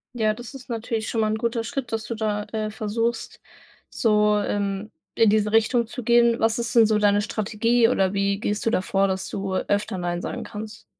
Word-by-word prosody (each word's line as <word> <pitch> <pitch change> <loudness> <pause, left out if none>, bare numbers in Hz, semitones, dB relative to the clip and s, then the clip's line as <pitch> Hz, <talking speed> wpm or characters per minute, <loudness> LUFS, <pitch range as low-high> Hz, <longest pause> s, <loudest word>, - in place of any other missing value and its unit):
Ja, 215 -2 +1
das 240 +3 -10
ist 260 -2 -11
natürlich 225 -1 -3
schon 225 - 0
mal 215 - +1
'n 220 - -1
guter 230 0 -1
Schritt, 245 +1 -4
dass 225 0 -2
du 230 - -4
da, 210 -2 -2
äh, 215 -1 -2
versuchst, 225 +2 -3 0.5
so, 210 -2 +2
ähm, 200 0 -2 0.2
in 220 -2 +4
diese 210 -1 +2
Richtung 225 +1 +2
zu 250 0 -7
gehen. 235 0 +4
Was 225 +1 +1
ist 235 0 -3
denn 230 -2 +7
so 215 -1 +2
deine 205 0 +3
Strategie, 225 +3 +1
oder 195 -5 +1
wie 200 0 0
gehst 210 -1 -2
du - - +5
da 185 - +1
vor, 195 +1 +1
dass 190 0 -2
du 195 -1 -3
öfter 205 +1 -1
Nein 175 0 -2
sagen - - -5
kannst? 215 -1 -8
215 Hz, 215 wpm, -24 LUFS, 205-230 Hz, 0.5 s, denn